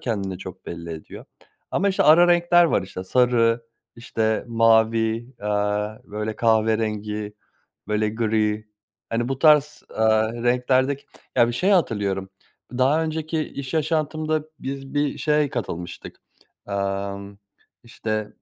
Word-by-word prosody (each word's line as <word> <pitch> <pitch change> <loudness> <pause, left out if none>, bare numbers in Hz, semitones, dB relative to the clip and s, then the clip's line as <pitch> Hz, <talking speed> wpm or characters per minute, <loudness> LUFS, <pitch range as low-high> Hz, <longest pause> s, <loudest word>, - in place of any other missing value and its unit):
kendini 100 -6 -3
çok 95 -1 -10
belli 85 0 -7
ediyor. 80 -1 -9 0.5
Ama, 200 +3 +1
işte, 195 - +1
ara 170 +3 +7
renkler 175 0 +5
var, 155 - +2
işte, 95 0 -7
sarı, 120 0 +2 0.3
işte, 110 -2 -1
mavi, 115 +1 +2
aaa, 105 +1 -1
böyle, 105 +1 -4
kahverengi, 110 -2 0 0.6
böyle 105 0 +1
gri, 110 -1 0 0.4
hani, 120 +2 -1
bu 135 - -2
tarz, 150 -1 +4
aaa, 110 0 +3
renklerdeki 125 +3 +1 0.3
ya, 120 - +5
bir - - -2
şeyi 185 +12 +2
hatırlıyorum. 100 - 0 0.5
Daha 145 +5 +3
önceki 160 0 -2
iş 140 -1 -6
yaşantımda 155 0 0
biz 135 +1 -6
bir 145 0 0
şeye 150 0 +2
katılmıştık, 90 -7 -6 0.5
aaa, 100 0 -2 0.6
işte, 110 -2 -4
115 Hz, 120 wpm, -23 LUFS, 105-140 Hz, 0.6 s, ara